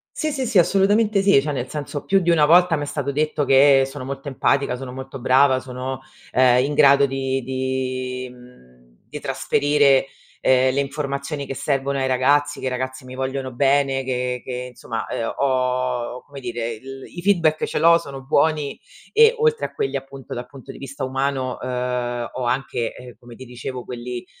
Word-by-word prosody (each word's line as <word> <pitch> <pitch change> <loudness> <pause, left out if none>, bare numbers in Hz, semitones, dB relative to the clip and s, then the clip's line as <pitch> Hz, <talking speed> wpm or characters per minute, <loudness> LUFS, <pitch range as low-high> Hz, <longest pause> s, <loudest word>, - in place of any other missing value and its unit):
Sì, 310 -1 -1
sì, 265 -4 -2
sì, 220 - +1
assolutamente 200 +3 +3
sì, 195 -6 +5
cioè 150 - -3
nel 130 -3 -4
senso: 145 -1 -5
più 195 - +3
di 175 -2 +1
una 155 -3 +5
volta 175 +1 +5
m'è 145 -1 -3
stato 140 -1 -3
detto 150 0 0
che 135 0 +6
sono 135 -1 -8
molto 135 +1 -6
empatica, 135 0 +1
sono 125 0 -7
molto 130 +1 -8
brava, 130 +1 +4
sono, 130 +1 -6 0.3
ehm, 125 -1 +4
in 145 - -2
grado 140 0 +6
di 135 0 -2
di, 130 0 -3
mhmm 125 - -18 0.3
di 150 0 -7
trasferire, 135 +1 +2 0.3
ehm, 130 0 +3
le 140 - 0
informazioni 140 +1 -4
che 135 - -5
servono 140 0 -1
ai 130 - 0
ragazzi, 145 +3 +2
che - - -6
i - - +1
ragazzi 130 0 -4
mi 130 - -10
vogliono 130 0 -3
bene, 135 0 +2
che 125 -1 -2
che, - - -7 0.2
insomma, 115 -2 -5
ehm, 115 - -3
ho 125 -2 -1
come 140 -1 -10
dire, 120 -2 -4
il 135 +4 -10
i 175 - -5
feedback 170 -5 +2
ce - - -4
l'ho, 170 +2 +6
sono 135 -4 -9
buoni 145 +1 +1 0.4
e, 455 +2 +6
oltre 460 0 +1
a - - -22
quelli, 135 +1 -1
appunto, 135 -1 -9
dal 125 +1 -6
punto 135 -1 -11
di - - -12
vista 135 0 -7
umano, 135 -1 -2
uhm, 125 -1 -2
ho 130 - -4
anche, 120 -1 -1
ehm, 125 -1 -11
come 120 -1 -13
ti 130 - -11
dicevo 125 +1 -7
quelli, 120 0 -6
135 Hz, 185 wpm, -22 LUFS, 125-145 Hz, 0.4 s, che